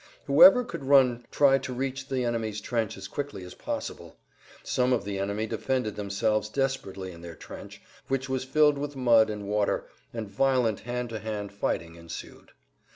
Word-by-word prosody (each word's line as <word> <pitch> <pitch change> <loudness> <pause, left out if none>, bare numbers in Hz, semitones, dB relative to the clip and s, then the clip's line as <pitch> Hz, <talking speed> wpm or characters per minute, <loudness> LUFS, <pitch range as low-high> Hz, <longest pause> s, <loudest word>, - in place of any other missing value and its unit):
Whoever 265 -2 +8
could 235 - -7
run 125 -4 +4
tried 135 -2 +4
to 130 -1 -5
reach 135 +1 -3
the 130 -2 0
enemy's 110 -3 -2
trench 110 -1 -2
as 95 0 -7
quickly 145 -9 -5
as 90 0 -9
possible. - - -6 0.5
Some 125 0 +1
of 120 - 0
the 100 -1 -3
enemy 100 +2 -1
defended 125 -2 -2
themselves 105 +1 0
desperately 105 -8 -2
in 85 -1 -12
their 85 -1 -9
trench, - - -11 0.2
which 135 0 -1
was 130 -1 -1
filled 150 +1 +3
with 145 0 -4
mud 115 -4 +5
and 105 -1 -5
water, 105 0 0 0.3
and 115 -2 -5
violent 125 -1 +1
hand 125 0 -4
to 110 -1 -5
hand 105 -2 -4
fighting 85 -4 -3
ensued. 85 0 -10
115 Hz, 170 wpm, -27 LUFS, 105-135 Hz, 0.5 s, Whoever